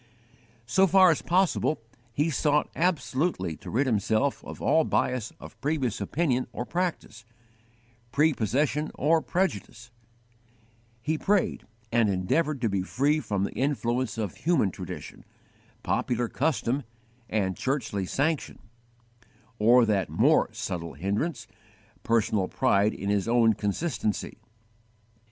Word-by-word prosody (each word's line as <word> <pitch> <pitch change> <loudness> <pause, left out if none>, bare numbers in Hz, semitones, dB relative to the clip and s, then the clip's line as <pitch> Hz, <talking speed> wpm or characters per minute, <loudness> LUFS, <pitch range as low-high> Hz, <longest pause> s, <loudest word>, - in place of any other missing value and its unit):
So 190 +11 +3
far 185 -1 +6
as 160 - -1
possible 180 -3 +1 0.3
he 150 +7 0
sought 150 +1 +1
absolutely 155 - 0
to - - -10
rid 135 +5 +1
himself 110 +3 0
of - - -9
all 160 - +3
bias 125 -7 0
of - - -12
previous 135 -5 -1
opinion 135 -6 0
or 120 +1 -4
practice, 170 -11 -3 0.9
prepossession 150 +1 +1
or 160 +3 +3
prejudice; 120 - -2 1.1
he 155 +4 -1
prayed 200 -1 0 0.2
and 115 -2 +3
endeavoured 130 - 0
to 115 - +2
be 100 -2 0
free 140 +10 +1
from 105 -7 -2
the - - -2
influence 125 -4 -1
of 105 -6 -3
human 160 - +2
tradition, - - -8 0.6
popular 120 -1 0
custom, 135 0 0 0.5
and 95 -4 0
churchly 115 -8 -2
sanction, 150 - -1 1.0
or 120 +3 +6
that 105 -3 0
more - - +3
subtle 85 -2 -5
hindrance, 110 - -2 0.6
_personal 110 -4 +1
pride 100 +2 +2
in 100 +1 -2
his 100 -1 0
own 115 -1 +4
consistency. 105 - -2
125 Hz, 120 wpm, -27 LUFS, 105-155 Hz, 1.1 s, far